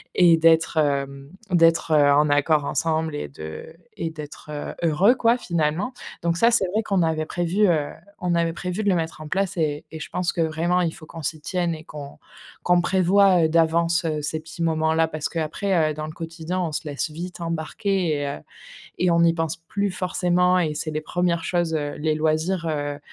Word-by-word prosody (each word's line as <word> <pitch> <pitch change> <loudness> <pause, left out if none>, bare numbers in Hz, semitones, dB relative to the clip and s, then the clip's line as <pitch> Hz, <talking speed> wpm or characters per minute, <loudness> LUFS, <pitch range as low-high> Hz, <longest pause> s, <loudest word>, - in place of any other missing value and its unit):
et 170 -2 +6
d'être, 165 0 +3
hem 140 -2 -1 0.2
d'être, 165 -1 +3
heu, 145 -1 +5
en 150 +1 +4
accord 145 +1 +2
ensemble 160 0 -1
et 145 - -4
de 80 +2 -9 0.3
et 165 -5 -3
d'être, 150 -1 -10
heu, 145 -1 -5
heureux, 170 +8 +4
quoi, 235 0 +3
finalement. 170 +4 -1 0.3
Donc 170 0 +1
ça, 230 +6 +5
c'est 215 -5 +3
vrai 220 - +2
qu'on 195 -4 +1
avait 160 -1 0
prévu, 175 +5 +1
heu, 150 -4 +1 0.3
on 180 -1 -1
avait 170 -1 +1
prévu 180 +4 -4
de 205 - +2
le 185 - +3
mettre 160 -2 -3
en 155 - -7
place 190 +3 -1
et 150 -2 -1
et 160 - -7
je - - -7
pense 180 -1 -1
que 170 - -1
vraiment 165 +3 +1
il 170 - 0
faut 155 - -12
qu'on 165 +1 -9
s'y 155 +2 -2
tienne 170 +2 -1
et 155 - -11
qu'on 145 -3 -10 0.5
qu'on 180 0 +4
prévoie, 185 0 +4
heu, - - +1
d'avance, 165 +1 +2
heu, 155 -2 -1
ces 155 +2 -2
petits 160 +1 -7
moments-là. 160 0 +2
Parce 155 -1 -4
qu'après, 165 0 0
heu, - - -4
dans 155 +1 -5
le 155 - -8
quotidien, 165 +2 -5
on 165 -3 -2
se 150 +1 -4
laisse 145 +2 -2
vite 175 +3 -7
embarquer 165 +4 -2 0.2
et 145 - -2
heu, 140 - -4 0.6
et 180 -1 +3
on 170 0 +4
y 165 0 +4
pense 165 -1 -2
plus 200 +4 -2
forcément, 180 0 +1
et 155 -3 0
c'est 155 +1 -3
les 155 0 -3
1res 170 +1 -1
choses, 175 -2 0
heu, 145 -2 -2
les 155 +1 0
loisirs, 160 +3 0
heu, 145 -1 -3
165 Hz, 210 wpm, -23 LUFS, 155-175 Hz, 0.6 s, et